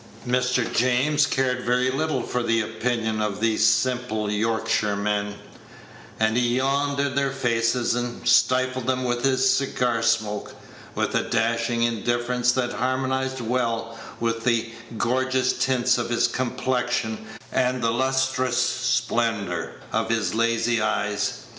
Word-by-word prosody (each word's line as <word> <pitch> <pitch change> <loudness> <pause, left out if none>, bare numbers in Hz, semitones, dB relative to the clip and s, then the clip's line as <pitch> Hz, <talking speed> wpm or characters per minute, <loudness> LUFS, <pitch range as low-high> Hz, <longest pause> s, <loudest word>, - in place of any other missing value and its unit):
Mr. 125 -1 +1
James 130 +5 +2
cared 130 -2 0
very 125 +1 +1
little 145 -2 -1
for 125 - -2
the 115 -1 +1
opinion 110 -1 -1
of 105 -1 -2
these 110 -1 +1
simple 115 -1 +1
Yorkshiremen; 105 -2 0 0.8
and 110 0 +2
he 120 0 +2
yawned 140 +2 0
in 140 -1 0
their 140 0 +1
faces, 120 -2 0
and 120 0 -4
stifled 130 +1 +3
them 130 0 0
with 120 -1 -1
his 130 -1 +3
cigar 125 -4 +1
smoke, 110 -2 -1 0.4
with - - -1
a - - 0
dashing 115 +1 +1
indifference 120 +1 +1
that 125 -1 -1
harmonized 130 +1 -1
well 115 -1 -1 0.2
with 115 -1 -1
the 115 -1 +1 0.3
gorgeous 130 +2 +1
tints 125 -2 +1
of 120 - -3
his 120 - +2
complexion 125 -2 -2 0.3
and 125 -1 0
the 115 - +2
lustrous 130 0 0
splendor 120 -6 0 0.2
of - - 0
his 115 -2 0
lazy 115 0 +1
eyes. 105 -1 -1
120 Hz, 130 wpm, -24 LUFS, 115-130 Hz, 0.8 s, stifled